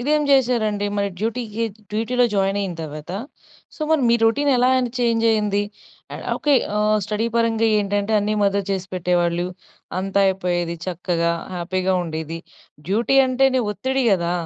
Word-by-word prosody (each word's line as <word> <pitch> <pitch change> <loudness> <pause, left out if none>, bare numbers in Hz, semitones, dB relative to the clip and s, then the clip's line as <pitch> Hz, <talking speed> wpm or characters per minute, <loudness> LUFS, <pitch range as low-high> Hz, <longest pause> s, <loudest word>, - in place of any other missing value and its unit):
ఇదేం 300 +4 +2
చేశారండి? 230 -6 +2
మరి 200 0 0
డ్యూటీకి 230 0 -2 0.3
డ్యూటీలో 245 +3 +1
జాయిన్ 195 0 +1
అయిన 190 -3 -3
తర్వాత. 155 +2 -7 0.6
సో, - - -19
మరి 315 -3 +3
మీ 235 - +5
రొటీన్ 285 +6 +2
ఎలా 250 +1 +3
అండి 250 -2 -1
చేంజ్ 230 -1 +1
అయ్యింది? 210 -2 +1 0.5
ఆ! - - -5 0.2
ఓకె. 290 -1 +2 0.2
ఆ! - - +1 0.3
స్టడీ 215 +2 -1
పరంగా 225 -1 +2
ఏంటంటే 205 +1 -1
అన్నీ 210 +1 0
మదర్ 200 0 +1
చేసి 190 -1 -2
పెట్టేవాళ్ళు 175 -1 0 0.5
అంతా 195 +1 0
అయిపోయేది 175 -3 -1
చక్కగా 170 -1 -1 0.2
హ్యాపీగా 185 +2 -1
ఉండేది. 160 0 -5 0.5
డ్యూటీ 235 +7 +2
అంటేనే 260 0 +2
ఒత్తిడి 260 +6 -1
కదా! 170 -2 +1
205 Hz, 145 wpm, -21 LUFS, 180-235 Hz, 0.6 s, మీ